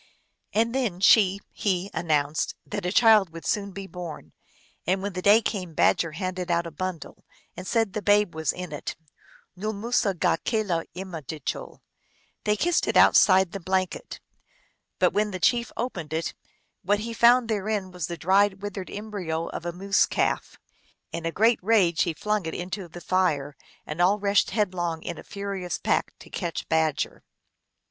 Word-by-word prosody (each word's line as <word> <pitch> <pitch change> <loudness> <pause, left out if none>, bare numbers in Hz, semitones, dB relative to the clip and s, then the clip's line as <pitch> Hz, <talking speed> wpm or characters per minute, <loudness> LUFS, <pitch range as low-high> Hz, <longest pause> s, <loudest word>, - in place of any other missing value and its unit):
And 230 +2 +1
then 240 -9 -1
she 200 0 +5
he 190 -1 -1
announced 150 -2 0
that 205 -3 -4
a - - -1
child 215 -4 +6
would 165 0 -10
soon 200 -1 0
be 195 +1 -7
born. 170 - -8 0.5
And 190 +2 +1
when 200 -1 -3
the 185 - -4
day 210 +4 +6
came 180 -6 -3
Badger 165 +1 +2
handed 185 +1 -4
out 170 0 +1
a 170 - -6
bundle, 185 +1 -6 0.3
and 180 +1 -7
said 225 -2 +2
that - - -24
the - - -12
babe 205 -3 +3
was 160 -2 0
in 180 -2 -7
it. 145 - -5 0.3
" - - -28
Nool 215 +4 -3
musugakelaimadijul" 185 - -2 0.3
" - - -39
They 210 - +3
kiss 345 +10 +2
it - - +2
outside 190 -3 +6
the 195 - -5
blan 185 +1 +1
ket." 185 - -9 0.8
But - - +3
when 210 +1 +1
the 185 -2 -5
chief 235 +5 +2
opened 180 -11 -4
it 160 +1 -2 0.5
what 205 +3 +1
he 230 +1 -4
found 235 +1 +5
therein 210 -3 -2
was 180 -4 -4
the 170 - -5
dried, 195 +3 +2
withered 205 -2 -5
embryo 185 -6 -4
of 170 - -6
a - - -1
moose 195 +3 +2
calf. - - -1 0.5
In 165 0 -3
a - - -1
great 225 +6 +3
rage 185 -5 +3
he 170 -3 0
flung 210 -3 -1
it 160 - -4
into 180 +1 -5
the 175 +1 -11
fire, 150 -7 0 0.3
and 155 +3 -3
all 190 +4 +4
rushed 200 -1 +2
headlong 180 -6 -1
in 170 -2 -5
a - - -10
furious 200 -3 -4
pack - - 0
to - - -15
catch 170 -3 -4
Badger. 160 -2 0
185 Hz, 175 wpm, -26 LUFS, 170-205 Hz, 0.8 s, child